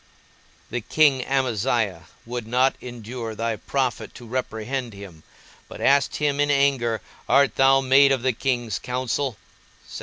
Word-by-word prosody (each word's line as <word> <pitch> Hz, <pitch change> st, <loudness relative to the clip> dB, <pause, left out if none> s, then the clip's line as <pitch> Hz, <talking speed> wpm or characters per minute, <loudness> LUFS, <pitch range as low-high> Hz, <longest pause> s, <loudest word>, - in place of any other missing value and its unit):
The 125 Hz, +1 st, -2 dB
king 140 Hz, +1 st, +3 dB
Amaziah 115 Hz, -9 st, -1 dB, 0.2 s
would 120 Hz, -1 st, -5 dB
not 125 Hz, +3 st, +2 dB
endure 120 Hz, -1 st, -7 dB
thy 115 Hz, 0 st, -2 dB
prophet 130 Hz, 0 st, -2 dB
to 120 Hz, -, -11 dB
reprehend 120 Hz, 0 st, -4 dB
him, 100 Hz, -5 st, -11 dB, 0.5 s
but -, -, -11 dB
asked 140 Hz, 0 st, +3 dB
him 145 Hz, -1 st, 0 dB
in 145 Hz, 0 st, +2 dB
anger, 135 Hz, -5 st, +1 dB, 0.3 s
_Art 140 Hz, +2 st, +4 dB
thou 135 Hz, 0 st, +4 dB
made 135 Hz, +1 st, +5 dB
of 130 Hz, -3 st, 0 dB
the 130 Hz, -1 st, +2 dB
king's 120 Hz, -4 st, -2 dB
counsel? 125 Hz, 0 st, -2 dB
125 Hz, 140 wpm, -23 LUFS, 115-135 Hz, 0.5 s, made